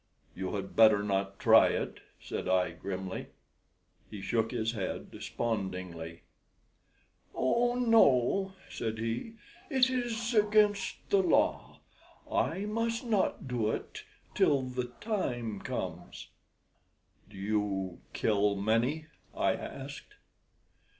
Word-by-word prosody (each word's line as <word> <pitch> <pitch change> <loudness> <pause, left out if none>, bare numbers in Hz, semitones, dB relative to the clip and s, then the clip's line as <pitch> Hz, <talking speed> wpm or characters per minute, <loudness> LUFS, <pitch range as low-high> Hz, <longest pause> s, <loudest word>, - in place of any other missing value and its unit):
"You 95 +2 -4
had 95 -1 -5
better 110 -2 +6
not 100 -1 -1
try - - +7
it," - - -2 0.2
said - - -5
I, 90 -2 +2
grimly. 95 +2 -5 0.8
He 105 - -7
shook 115 +3 0
his 115 -2 -1
head 100 -5 -4
despondingly. 90 -7 -4 1.1
"Oh 240 - +2
no," 195 - +4
said 110 -1 -4
he; 115 - -3 0.4
"it 260 -3 +3
is 240 -2 -1
against 210 -1 +2
the 200 - +5
law. 180 - +1 0.5
I 175 +4 0
must 230 +3 -1
not 210 - 0
do 120 -4 0
it - - -5 0.3
till 140 -2 +3
the 125 -1 -3 0.2
time 120 - -2
comes." - - -5 1.0
"Do 105 - -13
you 100 -2 -1
kill 105 -1 +2
many?" 115 +10 +1 0.3
I - - +2
asked. - - -8
115 Hz, 110 wpm, -31 LUFS, -, 1.1 s, try